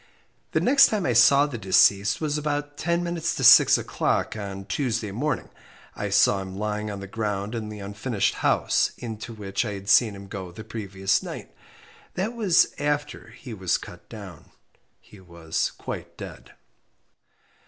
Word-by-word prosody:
The - - +3
next 275 +2 +6
time 210 -4 -1
I 125 - +1
saw 140 +5 +6
the 135 -6 -6
deceased 100 +1 +3
was 150 -2 -1
about 145 -1 -3
ten 170 +3 -1
minutes 170 -1 -2
to - - -4
six - - +8
o'clock - - -1
on 100 -2 -6
Tuesday 115 -1 -2
morning. 145 +9 -2 0.5
I 105 - -3
saw 100 0 +3
him 95 0 -8
lying 105 0 -3
on 100 -1 -6
the - - -6
ground 105 0 -3
in 110 -2 -4
the 105 - -8
unfinished 100 +2 -1
house - - +2
into 115 -1 -7
which 105 -2 -3
I 105 -3 -4
had 100 0 -7
seen 110 -5 +5
him 100 0 -10
go 95 -2 -7
the 110 +5 -10
previous 100 -3 -1
night. - - -8 0.6
That 205 +6 -2
was 210 -8 +3
after 145 0 -2
he 120 +1 -10
was 95 -4 0
cut - - -13
down. 100 -8 -11 0.5
He 105 - -17
was 85 -3 -3
quite - - -7
dead. - - -10
105 Hz, 165 wpm, -25 LUFS, 100-145 Hz, 0.6 s, six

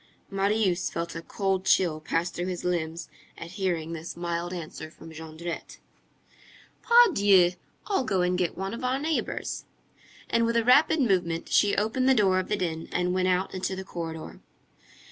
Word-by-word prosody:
Marius 195 -2 +1
felt 170 0 -4
a 165 - -4
cold 190 +2 -1
chill 170 -5 +3
pass 165 +2 -1
through 175 +2 -4
his 180 -2 -4
limbs 170 -2 -2 0.3
at 170 - -8
hearing 175 -4 -2
this 165 +1 -7
mild 170 0 -3
answer 160 -2 -7
from 165 0 -13
Jondrette. 160 +2 -7 1.0
"Pardieu! 205 - +6 0.3
I'll 390 -9 0
go 195 -6 0
and 180 0 +1
get 180 -2 -1
one 195 +2 -3
of 235 - -6
our 255 +1 +1
neighbor's." 310 +3 -2 0.6
And 230 0 +2
with 230 0 +1
a 230 - +3
rapid 290 +5 +5
movement, 180 -8 0
she 205 -1 +3
opened 235 +5 +1
the 265 - +5
door 190 -4 +3
of 185 - -3
the 210 - 0
den, 165 -3 -3
and 180 0 0
went 185 0 +1
out 185 +1 +1
into 190 0 -2
the 190 - -5
corridor. 165 -3 -7
185 Hz, 170 wpm, -27 LUFS, 170-205 Hz, 1.0 s, Pardieu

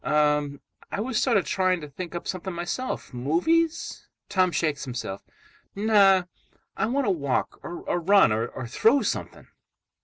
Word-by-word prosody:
"Um. 150 -1 +1 0.3
I - - -3
was 230 +1 0
sort 240 -5 +3
of 185 - +1
trying 185 +2 +1
to 150 - -7
think 175 +5 -7
up 170 - -5
something 185 -1 -4
myself. 175 - -4
Movies?" 180 - 0 0.2
Tom 185 -3 +2
shakes 155 -4 -1
himself. 120 -7 -5 0.5
"No. 200 -3 +5 0.5
I - - 0
want 270 +3 0
to 200 - +2
walk, 140 -7 -1
or 175 - -6 0.2
run, 195 - +5
or 115 +3 -2
throw 225 - +3
something." - - -4
180 Hz, 150 wpm, -26 LUFS, 145-205 Hz, 0.5 s, No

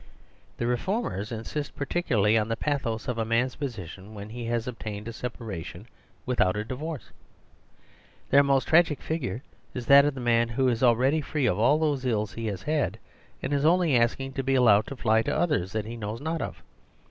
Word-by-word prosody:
The 120 - -2
reformers 125 - -1
insist 120 +6 -5
particularly 120 - +1
on 110 -1 +2
the 115 - -1
pathos 120 -7 -2
of 125 -2 -2
a - - +2
man's 115 +3 +1
position 105 - -7
when 105 0 -8
he 120 +1 -6
has 115 0 -1
obtained 110 -3 -6
a 115 - -5
separation 110 -6 -6 0.4
without 105 -7 +2
a 105 - -2
divorce. 145 +5 -6 1.2
Their 140 - +7
most 140 -1 +2
tragic 160 -3 +4
figure 140 -5 -3 0.3
is 125 -2 -4
that 140 +2 +8
of 145 -2 0
the - - -6
man 115 -1 +2
who 130 +3 +1
is 115 -2 -1
already 130 +5 +3
free 150 -2 -1
of 100 -4 +1
all 135 +7 +4
those 150 -4 0
ills 110 -4 -1
he 115 -1 -4
had, 110 - -1 0.5
and 135 - -1
is 140 0 +1
only 165 -2 +4
asking 130 +3 +1
to 135 - -2
be 135 +1 +1
allowed 110 -5 +5
to 140 - -6
fly 110 -2 +3
to - - -1
others 145 - 0
that 110 -1 -2
he 115 +2 -6
knows 110 +1 -5
not 160 +3 -3
of. - - -6
120 Hz, 195 wpm, -27 LUFS, 110-140 Hz, 1.2 s, that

